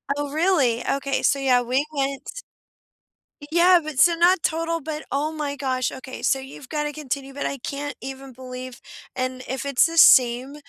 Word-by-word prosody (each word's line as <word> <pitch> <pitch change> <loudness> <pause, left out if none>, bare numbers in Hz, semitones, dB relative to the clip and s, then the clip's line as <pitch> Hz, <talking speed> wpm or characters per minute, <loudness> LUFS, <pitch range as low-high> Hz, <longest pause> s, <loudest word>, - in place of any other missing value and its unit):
Oh 290 -1 -4
really, 305 -8 +1
okay, 275 0 -1
so 280 - +2
yeah, 255 -2 +3
we 255 +4 0
went 275 - -4 1.1
Yeah, 350 +1 +5
but 300 -3 -5
so 335 +2 +6
not 345 +1 +4
total, 330 0 -1
but 305 +1 -5
oh 295 +3 -1
my 295 -2 -4
gosh, 260 -2 -1
okay 260 0 -9
so 270 - +2
you've 265 0 -11
gotta 295 -1 -2
continue, 275 -2 -5
but 285 - -4
I 275 - -3
can't 285 +1 -5
even 270 0 -8
believe 255 0 -9 0.3
and 255 0 -3
if 265 +2 -4
it's 280 0 +3
the 330 0 -3
same 255 0 +5
275 Hz, 175 wpm, -23 LUFS, 260-310 Hz, 1.1 s, so